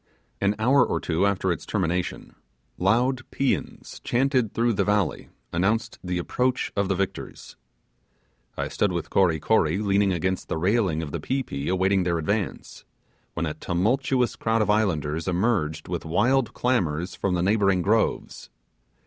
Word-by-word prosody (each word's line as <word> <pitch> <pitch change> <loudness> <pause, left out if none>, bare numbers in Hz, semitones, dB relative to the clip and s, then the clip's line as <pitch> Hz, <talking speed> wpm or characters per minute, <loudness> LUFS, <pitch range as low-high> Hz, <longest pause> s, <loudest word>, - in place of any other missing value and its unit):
An 100 +1 +2
hour 125 +4 +4
or - - -1
two 85 +4 +1
after 95 -2 0
its 85 - -3
termination, 90 -3 -2 0.5
loud 120 +7 +2
paeans 135 -1 -2
chanted 130 -2 +1
through 120 0 +1
the - - +1
valley 105 -1 0 0.2
announced 100 +7 0
the 90 -1 -2
approach 125 +8 -1
of 100 -2 +1
the 95 - +1
victors. 100 +1 -5 1.0
I - - -1
stood 105 - 0
with 85 -1 -4
Kory 85 -5 +3
Kory 80 -2 +2
leaning 100 -1 +2
against 95 +1 -1
the - - -1
railing 90 -2 +1
of 75 - -6
the - - -3
pi 135 +1 -1
pi 70 - -5
awaiting 95 +1 +2
their 85 -2 0
advance, 100 +5 -3 0.5
when 85 - -1
a 75 - -2
tumultuous 125 - 0
crowd 115 -1 +1
of 105 - +1
islanders 85 -7 0
emerged 90 -5 0
with 90 -1 -3
wild 120 +9 +1
clamours 90 -9 0
from 95 -2 -1
the 85 - 0
neighbouring 100 -2 +2
groves. 110 +3 0
100 Hz, 155 wpm, -25 LUFS, 85-115 Hz, 1.0 s, hour